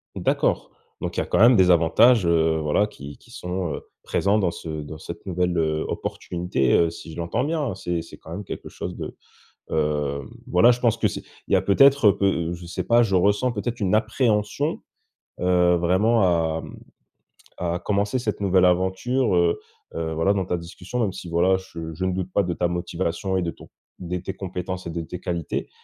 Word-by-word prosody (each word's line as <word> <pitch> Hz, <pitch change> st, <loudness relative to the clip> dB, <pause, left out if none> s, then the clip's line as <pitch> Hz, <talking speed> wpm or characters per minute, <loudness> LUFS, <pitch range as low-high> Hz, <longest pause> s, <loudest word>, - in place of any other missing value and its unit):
D'accord, -, -, 0 dB, 0.3 s
donc -, -, -4 dB
il -, -, +2 dB
y -, -, +1 dB
a -, -, -8 dB
quand -, -, 0 dB
même 120 Hz, +2 st, +7 dB
des 90 Hz, -1 st, +5 dB
avantages, 90 Hz, +7 st, +5 dB
heu, 80 Hz, -1 st, +3 dB
voilà, 75 Hz, +7 st, +1 dB
qui 70 Hz, -7 st, -10 dB
qui -, -, -20 dB
sont, 90 Hz, -3 st, -3 dB
heu, -, -, -5 dB, 0.2 s
présents 100 Hz, +2 st, +1 dB
dans 90 Hz, -4 st, +1 dB
ce 85 Hz, -, -8 dB
dans 75 Hz, +1 st, -8 dB
cette 85 Hz, +3 st, -9 dB
nouvelle, 90 Hz, -1 st, 0 dB
heu, 80 Hz, -1 st, 0 dB
opportunité, 85 Hz, -7 st, -2 dB
heu, 85 Hz, -1 st, +4 dB
si 80 Hz, -1 st, -10 dB
je -, -, -10 dB
l'entends 85 Hz, +9 st, -1 dB
bien, 155 Hz, +1 st, -1 dB
hein. 120 Hz, -9 st, -2 dB
C'est 90 Hz, -3 st, -2 dB
c'est 80 Hz, -, -12 dB
quand 80 Hz, -, -13 dB
même 100 Hz, +3 st, -6 dB
quelque -, -, -7 dB
chose -, -, -6 dB
de, -, -, -7 dB, 0.5 s
heu, 75 Hz, -2 st, 0 dB, 0.3 s
voilà 120 Hz, -1 st, +5 dB
je 120 Hz, -, +3 dB
pense 115 Hz, -2 st, +2 dB
que -, -, +2 dB
c'est -, -, -6 dB, 0.2 s
il -, -, -1 dB
y -, -, +7 dB
a -, -, +3 dB
peut-être, 135 Hz, +2 st, +6 dB
heu, -, -, +1 dB
peu 85 Hz, -4 st, +1 dB
je 85 Hz, 0 st, -9 dB
sais 90 Hz, +1 st, -3 dB
pas, 120 Hz, +5 st, +4 dB
je 100 Hz, -5 st, +2 dB
ressens 105 Hz, +7 st, +3 dB
peut-être 120 Hz, +3 st, -3 dB
une 100 Hz, 0 st, +2 dB
appréhension, 110 Hz, +5 st, 0 dB, 0.6 s
heu, 90 Hz, -1 st, +3 dB
vraiment 95 Hz, +7 st, +3 dB
à, 80 Hz, -3 st, +2 dB
mmh, -, -, -10 dB, 0.8 s
à 85 Hz, 0 st, -1 dB
commencer 105 Hz, +6 st, 0 dB
cette 105 Hz, -3 st, -3 dB
nouvelle 95 Hz, -2 st, +4 dB
aventure, 95 Hz, +6 st, +1 dB
heu, 85 Hz, -1 st, +2 dB, 0.4 s
heu, 80 Hz, -1 st, -2 dB
voilà, 95 Hz, +5 st, +2 dB
dans 95 Hz, -3 st, -1 dB
ta 90 Hz, -, -1 dB
discussion, 90 Hz, +7 st, -6 dB
même 105 Hz, -5 st, 0 dB
si 90 Hz, -2 st, -8 dB
voilà 85 Hz, +3 st, +3 dB
je 85 Hz, -4 st, -7 dB
je 85 Hz, +4 st, -5 dB
ne 95 Hz, -, +1 dB
doute 90 Hz, 0 st, -3 dB
pas 100 Hz, -, +3 dB
de 90 Hz, -1 st, -2 dB
ta 85 Hz, -, 0 dB
motivation 85 Hz, +2 st, -2 dB
et -, -, +1 dB
de 85 Hz, -1 st, -2 dB
ton -, -, -15 dB, 0.3 s
des 90 Hz, 0 st, -4 dB
tes 95 Hz, -, -5 dB
compétences 95 Hz, -1 st, -5 dB
et 85 Hz, -, -4 dB
de 85 Hz, 0 st, -3 dB
tes 90 Hz, +2 st, -7 dB
qualités. 85 Hz, -3 st, -3 dB
90 Hz, 215 wpm, -24 LUFS, 85-105 Hz, 0.8 s, même